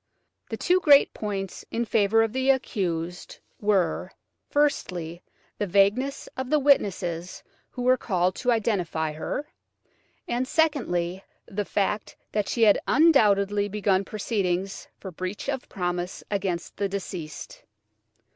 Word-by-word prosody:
The -, -, -4 dB
two 365 Hz, +1 st, +3 dB
great 290 Hz, -6 st, +6 dB
points 195 Hz, -3 st, -4 dB
in 235 Hz, +1 st, -1 dB
favour 225 Hz, 0 st, +3 dB
of 225 Hz, -1 st, -2 dB
the 260 Hz, +1 st, 0 dB
accused 180 Hz, -10 st, -1 dB, 0.2 s
were, 195 Hz, -5 st, +1 dB, 0.4 s
firstly, 180 Hz, -, 0 dB, 0.4 s
the 205 Hz, -, 0 dB
vagueness 205 Hz, +9 st, +2 dB
of 260 Hz, -1 st, -4 dB
the 305 Hz, -, +4 dB
witnesses 185 Hz, -, +1 dB, 0.3 s
who 245 Hz, -, -6 dB
were 255 Hz, +1 st, +4 dB
called 185 Hz, -5 st, 0 dB
to 250 Hz, -, -1 dB
identify 180 Hz, -8 st, 0 dB
her, 160 Hz, -, -4 dB, 0.8 s
and, 245 Hz, +2 st, -1 dB
secondly, 195 Hz, -, 0 dB, 0.2 s
the 205 Hz, +1 st, -3 dB
fact 210 Hz, +2 st, -1 dB, 0.2 s
that 210 Hz, -2 st, -1 dB
she 230 Hz, -, +1 dB
had 210 Hz, -2 st, +6 dB
undoubtedly 205 Hz, -9 st, +4 dB
begun 200 Hz, -1 st, +1 dB
proceedings 195 Hz, -3 st, -2 dB
for 190 Hz, -, -8 dB
breach 185 Hz, +7 st, -5 dB
of 265 Hz, -2 st, -3 dB
promise 175 Hz, -1 st, -3 dB
against 190 Hz, -4 st, -2 dB
the 200 Hz, -1 st, -1 dB
deceased. 185 Hz, -5 st, -6 dB
200 Hz, 125 wpm, -26 LUFS, 180-245 Hz, 0.8 s, great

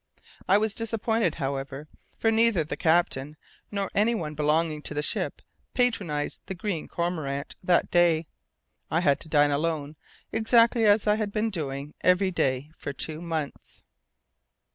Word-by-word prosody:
I 195 Hz, -, +7 dB
was 215 Hz, 0 st, +1 dB
disappointed, 225 Hz, -5 st, 0 dB
however, 135 Hz, 0 st, -4 dB, 0.3 s
for 225 Hz, -, +2 dB
neither 225 Hz, -6 st, +3 dB
the 155 Hz, -, -5 dB
captain 160 Hz, -4 st, +1 dB, 0.3 s
nor 200 Hz, -2 st, -3 dB
anyone 205 Hz, -7 st, +1 dB
belonging 150 Hz, +1 st, +1 dB
to 150 Hz, -, -6 dB
the 150 Hz, -, -1 dB
ship -, -, -2 dB, 0.3 s
patronized 200 Hz, -, 0 dB
the 190 Hz, -, -4 dB
Green 180 Hz, -3 st, -3 dB
Cormorant 155 Hz, -5 st, -3 dB
that 180 Hz, -1 st, +2 dB
day. 170 Hz, -2 st, +4 dB, 0.6 s
I 165 Hz, -, +1 dB
had 140 Hz, -5 st, +3 dB
to 160 Hz, -, -5 dB
dine 145 Hz, -1 st, +4 dB
alone, 150 Hz, 0 st, -1 dB, 0.4 s
exactly 230 Hz, 0 st, +4 dB
as 205 Hz, +1 st, +4 dB
I 210 Hz, 0 st, +3 dB
had 215 Hz, -2 st, -2 dB
been 220 Hz, +2 st, 0 dB
doing 145 Hz, -4 st, -4 dB
every 185 Hz, +1 st, +3 dB
day 135 Hz, -3 st, -1 dB
for 140 Hz, -, -5 dB
two 155 Hz, +3 st, -4 dB
months. 160 Hz, -4 st, -5 dB
165 Hz, 145 wpm, -27 LUFS, 150-205 Hz, 0.6 s, I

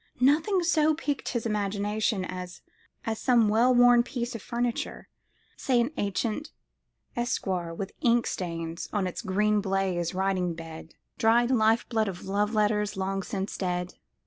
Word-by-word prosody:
Nothing 315 Hz, +9 st, +3 dB
so 315 Hz, -2 st, +3 dB
piqued 290 Hz, -3 st, -3 dB
his 235 Hz, -2 st, -2 dB
imagination 210 Hz, -1 st, -1 dB
as 180 Hz, -1 st, -7 dB, 0.5 s
some 230 Hz, -1 st, +3 dB
well 230 Hz, +4 st, +4 dB
worn 245 Hz, 0 st, +7 dB
piece 240 Hz, 0 st, -4 dB
of 230 Hz, -, -6 dB
furniture—say 240 Hz, +2 st, -3 dB
an 240 Hz, +4 st, +1 dB
ancient 215 Hz, +7 st, -2 dB, 0.7 s
escritoire 190 Hz, -8 st, -1 dB
with 195 Hz, +2 st, -5 dB
ink 235 Hz, -1 st, +3 dB
stains 165 Hz, -2 st, -4 dB
on 205 Hz, -3 st, 0 dB
its 180 Hz, -, -4 dB
green 210 Hz, 0 st, +1 dB
baize 190 Hz, -3 st, -1 dB
writing 185 Hz, -2 st, 0 dB
bed 165 Hz, -1 st, -10 dB, 0.2 s
(dried 235 Hz, +2 st, +4 dB
life 225 Hz, -1 st, +3 dB
blood 220 Hz, -2 st, 0 dB
of 180 Hz, -2 st, -6 dB
love 205 Hz, +3 st, 0 dB
letters 210 Hz, -1 st, +1 dB
long 195 Hz, 0 st, -1 dB
since 195 Hz, +1 st, -4 dB
dead!) 180 Hz, -1 st, -2 dB
210 Hz, 140 wpm, -27 LUFS, 190-240 Hz, 0.7 s, worn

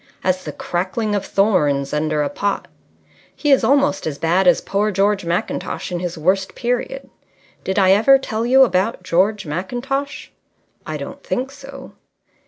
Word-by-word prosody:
As 185 Hz, 0 st, 0 dB
the -, -, -4 dB
crackling 195 Hz, +5 st, -2 dB
of 200 Hz, -1 st, 0 dB
thorns 150 Hz, -10 st, +1 dB
under 150 Hz, 0 st, 0 dB
a 145 Hz, -, -1 dB
pot.... 205 Hz, 0 st, -2 dB, 0.7 s
He 295 Hz, -, 0 dB
is 270 Hz, -, +5 dB
almost 280 Hz, -, +2 dB
as 145 Hz, -2 st, -4 dB
bad 175 Hz, +5 st, +2 dB
as 175 Hz, -, +5 dB
poor 205 Hz, +2 st, -1 dB
George 200 Hz, -1 st, +1 dB
Mackintosh 170 Hz, +2 st, -3 dB
in 175 Hz, -, -2 dB
his 175 Hz, -1 st, -4 dB
worst 190 Hz, +4 st, 0 dB
period. 245 Hz, -, -3 dB, 0.6 s
Did 190 Hz, -, -2 dB
I 190 Hz, -2 st, +5 dB
ever 225 Hz, +8 st, +6 dB
tell 230 Hz, -4 st, -3 dB
you 260 Hz, +3 st, +6 dB
about 195 Hz, -3 st, 0 dB
George 190 Hz, +3 st, +1 dB
Mackintosh?" 245 Hz, -, -4 dB, 0.6 s
"I -, -, -3 dB
don't -, -, -8 dB
think 260 Hz, +1 st, -3 dB
so." 275 Hz, -1 st, -11 dB
195 Hz, 160 wpm, -20 LUFS, 175-245 Hz, 0.7 s, ever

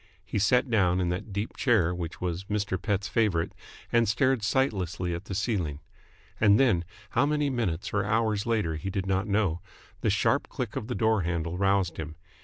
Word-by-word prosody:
He 100 Hz, +3 st, -2 dB
sat 125 Hz, +7 st, +3 dB
down 95 Hz, -6 st, +2 dB
in 90 Hz, -1 st, 0 dB
that 90 Hz, +4 st, -4 dB
deep 100 Hz, +3 st, -3 dB
chair 105 Hz, -10 st, +2 dB
which 85 Hz, -2 st, -5 dB
was 90 Hz, +1 st, -3 dB
Mr. 100 Hz, -3 st, -2 dB
Pett's 100 Hz, -1 st, -1 dB
favourite, 100 Hz, -8 st, +1 dB, 0.4 s
and 115 Hz, -2 st, +3 dB
stared 130 Hz, +2 st, +2 dB
sightlessly 95 Hz, -, 0 dB
at 85 Hz, +4 st, -5 dB
the 95 Hz, -, -5 dB
ceiling. 95 Hz, -8 st, -1 dB, 0.6 s
And 105 Hz, -1 st, +5 dB
then, 105 Hz, -11 st, +3 dB, 0.3 s
how 140 Hz, -, +3 dB
many 150 Hz, -1 st, +1 dB
minutes 100 Hz, -9 st, -2 dB
or 105 Hz, 0 st, +2 dB
hours 110 Hz, 0 st, 0 dB
later 105 Hz, -9 st, 0 dB
he 95 Hz, +5 st, -4 dB
did 95 Hz, -1 st, -2 dB
not 95 Hz, +2 st, 0 dB
know, 100 Hz, -5 st, +1 dB, 0.4 s
the -, -, 0 dB
sharp -, -, +1 dB
click -, -, -4 dB
of 110 Hz, -, -4 dB
the 125 Hz, -, -3 dB
door 110 Hz, -2 st, +2 dB
handle 85 Hz, -1 st, -2 dB
roused 95 Hz, -2 st, +1 dB
him. 80 Hz, 0 st, -6 dB
100 Hz, 190 wpm, -28 LUFS, 90-110 Hz, 0.6 s, And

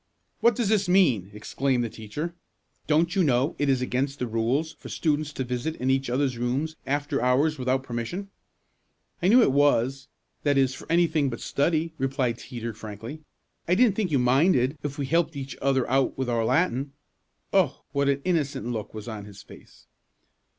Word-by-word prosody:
"What 235 Hz, -1 st, +4 dB
does 225 Hz, -3 st, 0 dB
this 205 Hz, -4 st, +2 dB
mean?" 135 Hz, -, +3 dB
exclaimed 125 Hz, +4 st, -1 dB
the -, -, -1 dB
teacher. 145 Hz, +11 st, -5 dB, 0.5 s
"Don't 165 Hz, +2 st, +2 dB
you 190 Hz, -, +3 dB
know 135 Hz, +1 st, +2 dB
it 145 Hz, -1 st, +1 dB
is 130 Hz, -2 st, +2 dB
against 135 Hz, +3 st, -1 dB
the 125 Hz, -, -2 dB
rules 120 Hz, +8 st, 0 dB
for -, -, -10 dB
students 150 Hz, -2 st, 0 dB
to 130 Hz, -, -3 dB
visit 125 Hz, +6 st, -3 dB
in 130 Hz, +1 st, 0 dB
each 135 Hz, -1 st, 0 dB
others' 130 Hz, -1 st, 0 dB
rooms 135 Hz, +6 st, -1 dB
after 145 Hz, 0 st, -1 dB
hours 135 Hz, +5 st, +2 dB
without 130 Hz, +1 st, 0 dB
permission?" 135 Hz, -, -5 dB, 0.9 s
"I 175 Hz, -, +2 dB
knew 235 Hz, +5 st, +7 dB
it -, -, +3 dB
was 135 Hz, -1 st, +2 dB, 0.3 s
that 145 Hz, -1 st, +2 dB
is 135 Hz, -1 st, +3 dB
for -, -, -9 dB
anything 165 Hz, -4 st, +3 dB
but 115 Hz, -, -6 dB
study," 160 Hz, +2 st, 0 dB
replied 135 Hz, -3 st, 0 dB
Teeter 115 Hz, -3 st, -6 dB
frankly. 110 Hz, +7 st, -8 dB, 0.5 s
"I 175 Hz, -, +3 dB
didn't 225 Hz, -1 st, +4 dB
think 205 Hz, -4 st, 0 dB
you 145 Hz, -, +2 dB
minded 130 Hz, +2 st, +3 dB
if 145 Hz, -1 st, -5 dB
we 140 Hz, -, -2 dB
helped 165 Hz, +2 st, +1 dB
each 135 Hz, -1 st, -6 dB
other 135 Hz, -1 st, +2 dB, 0.3 s
with 130 Hz, -2 st, -2 dB
our 115 Hz, -1 st, +1 dB
Latin." 140 Hz, -1 st, +1 dB, 0.6 s
Oh! 185 Hz, -8 st, +2 dB
what 140 Hz, 0 st, +1 dB
an 140 Hz, 0 st, 0 dB
innocent 150 Hz, -8 st, 0 dB
look 115 Hz, -3 st, -4 dB
was 110 Hz, +1 st, -7 dB
on 110 Hz, -3 st, -6 dB
his 100 Hz, -1 st, -12 dB
face! -, -, -16 dB
135 Hz, 180 wpm, -26 LUFS, 125-160 Hz, 0.9 s, knew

